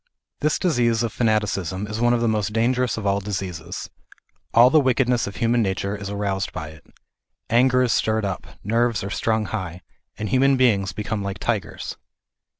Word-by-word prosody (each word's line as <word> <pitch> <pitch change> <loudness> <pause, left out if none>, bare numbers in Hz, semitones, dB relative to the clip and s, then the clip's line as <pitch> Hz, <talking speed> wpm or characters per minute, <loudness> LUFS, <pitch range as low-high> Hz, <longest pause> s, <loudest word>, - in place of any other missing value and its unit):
This 150 0 +1
disease 120 -9 +1
of 115 -2 -2
fanaticism 105 -4 0
is 110 +2 -5
one 120 0 +4
of 120 -1 +2
the 120 - +2
most 105 -1 0
dangerous 120 0 +1
of 110 - -5
all 100 0 +2
diseases. 95 -5 -5 0.6
All 120 +2 +6
the 155 - +6
wickedness 125 -3 +2
of 100 - -7
human 115 +1 +2
nature 100 0 -1
is 100 -1 -6
aroused 100 -1 -2
by 75 -1 -6
it. 80 -1 -14 0.7
Anger 125 +2 +4
is 125 - +2
stirred 110 -1 +1
up, 95 -2 -4 0.2
nerves 115 0 +1
are 100 - -5
strung 110 0 0
high, 90 -5 -5 0.3
and 105 - -3
human 135 +4 +4
beings 100 -7 +3
become 105 +1 -3
like 100 0 -4
tigers. 110 -7 -3
110 Hz, 175 wpm, -23 LUFS, 100-120 Hz, 0.7 s, All